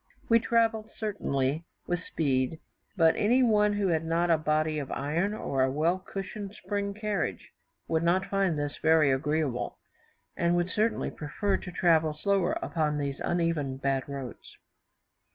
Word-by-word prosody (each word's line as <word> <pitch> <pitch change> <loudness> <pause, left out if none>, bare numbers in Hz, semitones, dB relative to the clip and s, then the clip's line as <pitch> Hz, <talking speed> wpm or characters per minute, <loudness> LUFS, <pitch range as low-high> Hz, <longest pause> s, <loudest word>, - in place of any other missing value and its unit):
We 230 0 +6
travelled 225 -2 +1
certainly 155 -8 -1 0.2
with 175 -1 -2
speed; 135 0 0 0.4
but 165 -2 +5
any 245 +5 +3
one 210 -3 +3
who 205 -2 0
had 160 -1 +1
not 170 +1 +1
a 165 - +5
body 155 0 +1
of 140 - -6
iron, 170 +9 -1
or 135 -9 -1
a 130 - +3
well 165 +6 +1
cushioned 195 +2 -6
spring 200 -1 -3
carriage, 210 -1 -3 0.4
would 160 -1 +1
not 180 +3 +2
find 195 -5 0
this 145 0 -3
very 160 -3 +5
agreeable, 145 -2 -1 0.6
and 170 0 +2
would 175 +1 0
certainly 220 +2 0
prefer 195 +7 -2
to 180 - -8
travel 160 -3 +3
slower 195 +2 +1
upon 150 -2 0
these 140 -2 -3
uneven, 165 -6 -1
bad 135 0 -1
roads. 135 -4 -8
165 Hz, 155 wpm, -28 LUFS, 150-200 Hz, 0.6 s, We